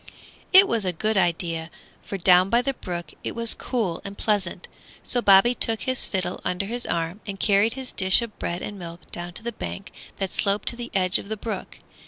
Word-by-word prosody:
It 385 +1 +8
was 230 -3 0
a 185 - +1
good 215 +6 -1
idea, 170 -3 0 0.3
for 195 - -5
down 180 +1 +5
by 235 +4 +3
the 275 - 0
brook 175 -9 -6
it - - -4
was 230 -1 +3
cool 215 -10 -2
and 200 0 -8
pleasant; 195 -5 -1 0.4
so 245 - 0
Bobby 200 +3 +6
took 225 -2 +2
his 260 -1 +1
fiddle 185 -2 -3
under 180 +2 -1
his 240 +4 -4
arm 170 +4 -2
and 195 -1 -5
carried 205 +2 +3
his 265 -1 -6
dish 190 +4 +4
of 225 -3 -9
bread 175 +1 -3
and 205 -1 -6
milk 170 -1 -10
down 175 0 -6
to 220 - -6
the 235 - -3
bank 200 -2 -7 0.3
that 195 -2 -3
sloped 200 +1 0
to - - -4
the 240 0 -7
edge 185 0 +2
of 200 - -10
the 220 - -3
brook. 210 -3 -6
200 Hz, 215 wpm, -24 LUFS, 180-230 Hz, 0.4 s, It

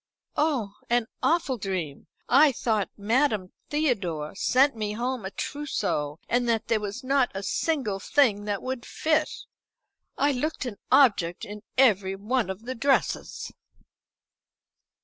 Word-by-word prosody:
"Oh, 270 -10 0
an 240 -1 +2 0.2
awful 315 -7 +1
dream. 180 -8 -4 0.2
I 280 +2 +6
thought 220 -4 0
Madame 215 -2 +1 0.2
Theodore 195 - -1
sent 260 +7 +3
me 210 -2 -3
home 245 -1 -2
a - - -2
trousseau 190 - -2
and 245 0 +1
that 225 -2 0
there 225 - +3
was 210 +5 -5
not 270 -1 +2
a 195 - -4
single 255 -7 -1
thing 210 -4 +2
that 205 -1 -2
would 255 -1 -3
fit. 310 +2 +1 0.9
I 285 - +3
looked 285 +2 -2
an 225 -5 -5
object 200 -11 +4
in 210 +1 -8 0.2
every 200 -7 +4
one 215 +2 -1
of 190 +4 -6
the 255 - -3
dresses." 270 +3 0
230 Hz, 135 wpm, -26 LUFS, 200-270 Hz, 0.9 s, I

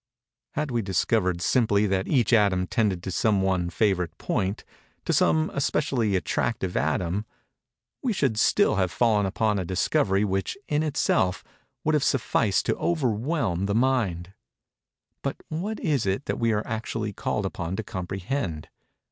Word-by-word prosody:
Had 150 -1 -1
we 120 -1 +1
discovered, 95 -2 0
simply, 105 -4 +3
that 95 -1 0
each 125 -4 +2
atom 100 -5 +4
tended 95 -3 0
to 95 - -4
some 100 0 +2
one 90 -2 +1
favorite 90 -4 0
point—to 95 +2 -4
some 155 0 +3
especially 130 -7 0
attractive 95 0 -1
atom—we 100 - -4
should 135 - 0
still 105 - +3
have 95 -2 +2
fallen 105 -3 +2
upon 105 +1 0
a - - -1
discovery 95 - +1
which, 95 - -2
in 150 0 +1
itself, 135 -11 +1 0.4
would 155 - +1
have 150 -2 +2
sufficed 115 -6 +1
to - - +1
overwhelm 125 - 0
the 100 - 0
mind:—but 110 -5 -3
what 195 +8 -3
is 140 -9 0
it 95 +8 -1
that - - -2
we 115 -1 +2
are 105 0 0
actually 110 -2 -3
called 100 +1 -2
upon 90 -1 -3
to 110 - -3
comprehend? 95 - -4
105 Hz, 140 wpm, -26 LUFS, 95-125 Hz, 0.4 s, atom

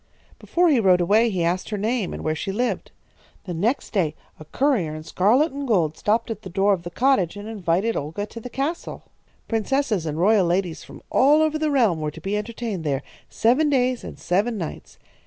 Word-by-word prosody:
"Before 350 +1 +1
he 280 -6 +4
rode 185 -4 +4
away 210 +7 +3
he 185 -5 -1
asked 175 +2 -1
her 210 - -2
name 220 -1 -1
and - - -6
where 155 - 0
she 195 +5 -4
lived. 240 +5 -2 0.5
The 180 - -5
next 215 +11 -1
day 165 -7 0 0.2
a 155 - -10
courier 200 - 0
in 155 - -7
scarlet 220 - +2
and 280 0 -5
gold 170 -9 +2
stopped 225 +2 0
at 220 - -5
the 190 - -8
door 195 +3 +2
of 185 - -2
the 175 - -7
cottage 220 -6 +2
and 205 +1 -7
invited 205 +1 0
Olga 160 +8 -3
to 230 - -10
the 250 - -8
castle. 280 +7 -4 0.4
Princesses 225 - 0
and 150 0 -3
royal 195 +1 +4
ladies 175 -1 -1
from - - -13
all 295 +4 +5
over 310 0 0
the 310 0 +1
realm 225 - +2
were 155 - -1
to 150 - -10
be 195 +5 -3
entertained 210 -3 -4
there, 140 -3 -1 0.3
seven 260 +7 +2
days 255 -3 +1
and - - -8
seven 210 +6 0
nights. 170 -5 -7
210 Hz, 210 wpm, -23 LUFS, 175-245 Hz, 0.5 s, all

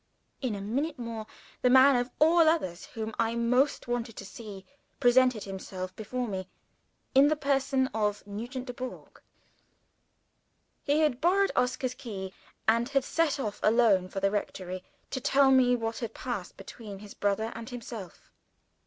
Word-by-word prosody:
In 250 -6 -1
a 200 - -5
minute 275 +10 -2
more, 230 -3 -5 0.3
the 250 - +4
man 265 +2 +7
of 245 0 0
all 325 +3 +5
others 185 - -1
whom 220 -2 -6
I 230 0 +1
most 250 +5 +2
wanted 240 -2 -2
to 200 - -8
see, 195 -1 -9 0.3
presented 250 -3 +4
himself 185 -1 -6
before 245 +3 -3
me, 190 -3 -4 0.7
in 275 +2 +7
the 310 - +2
person 275 -2 +1
of 210 -2 -1
Nugent 240 +6 -6
Dubourg. 255 0 -8 1.6
He 295 +2 +3
had 285 -4 +1
borrowed 390 +4 +3
Oscar's 250 0 0
key, 205 -8 -7 0.3
and 230 +3 +3
had 275 -1 +2
set 315 0 +1
off 210 -6 -3
alone 215 -5 +4
for 195 - -4
the 195 0 +2
rectory 185 -3 -4 0.3
to 260 - -3
tell 275 +1 +4
me 250 -2 +5
what 225 -1 -3
had 230 -3 -5
passed 240 -8 -5
between 200 +1 -9
his 205 +1 -11
brother 205 +3 0
and 230 +1 -8
himself. 230 -7 -9
235 Hz, 155 wpm, -29 LUFS, 205-260 Hz, 1.6 s, man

